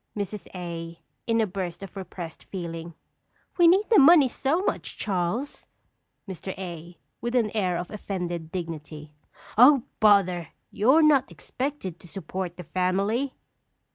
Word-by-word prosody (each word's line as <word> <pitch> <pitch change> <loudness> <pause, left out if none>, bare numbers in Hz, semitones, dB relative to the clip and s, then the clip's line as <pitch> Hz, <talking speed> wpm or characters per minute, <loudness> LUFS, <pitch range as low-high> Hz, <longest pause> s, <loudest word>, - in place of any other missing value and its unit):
Mrs. 205 0 -4
A. 170 -2 -6 0.3
(in 230 0 +2
a 220 - +3
burst 185 -2 -5
of 195 - -10
repressed 175 -3 -8
feeling). 170 -3 -6 0.6
We 345 - +7
need 385 +5 +4
the 435 - +8
money 295 -1 +8
so 285 +8 0
much, - - -3
Charles! 200 +7 -2 0.6
Mr. 190 0 -6
A. 175 -2 -8 0.2
(with 240 +1 -2
an 225 -4 +2
air 185 -5 +1
of 175 0 -5
offended 175 -5 -4
dignity). 155 -4 -6 0.5
Oh, 260 0 +8 0.2
bother! 185 -6 +4 0.2
You 215 +5 +1
are 320 +1 +6
not 280 -4 +4
expected 255 - -5
to - - -13
support 180 0 -5
the 180 - -7
family. 195 - 0
190 Hz, 140 wpm, -26 LUFS, 175-240 Hz, 0.6 s, the